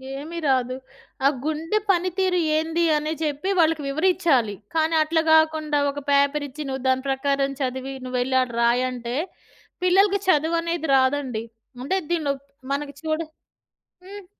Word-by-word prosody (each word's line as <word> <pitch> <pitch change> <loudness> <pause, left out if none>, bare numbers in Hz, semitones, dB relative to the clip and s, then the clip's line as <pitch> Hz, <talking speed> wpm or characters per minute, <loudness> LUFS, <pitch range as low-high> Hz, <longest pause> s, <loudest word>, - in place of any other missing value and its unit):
ఏమి 315 +5 -7
రాదు. 255 -2 +1 0.5
ఆ - - +8 0.2
గుండె 320 +7 -1
పనితీరు 365 0 +1 0.2
ఏంది 325 +2 0
అని 305 +1 -2
జెప్పి 300 +5 -2
వాళ్ళకి 320 -2 +3
వివరిచ్చాలి. 310 - +2 0.2
కానీ, 320 0 +2
అట్లా 320 +1 +1
గాకుండా 315 -2 +3
ఒక 285 - -7
పేపర్ 280 +1 +2
ఇచ్చి, 300 +3 -7
నువ్వు 265 -1 -4
దాని 260 0 +2
ప్రకారం 275 0 0
చదివి 260 +1 -3
నువ్వెళ్ళి, 255 +1 -1
ఆడ 255 - -2
రాయంటే 245 0 0 0.7
పిల్లలకి 390 +2 +4
చదువనేది 335 0 +1
రాదండి. 260 -3 +1 0.4
అంటే 375 +9 0
దీంట్లో 310 -5 +1 0.4
మనకి 285 0 -3
చూడ 315 0 -1 0.9
హ్మ్. 400 0 -10
300 Hz, 130 wpm, -23 LUFS, 265-330 Hz, 0.9 s, ఆ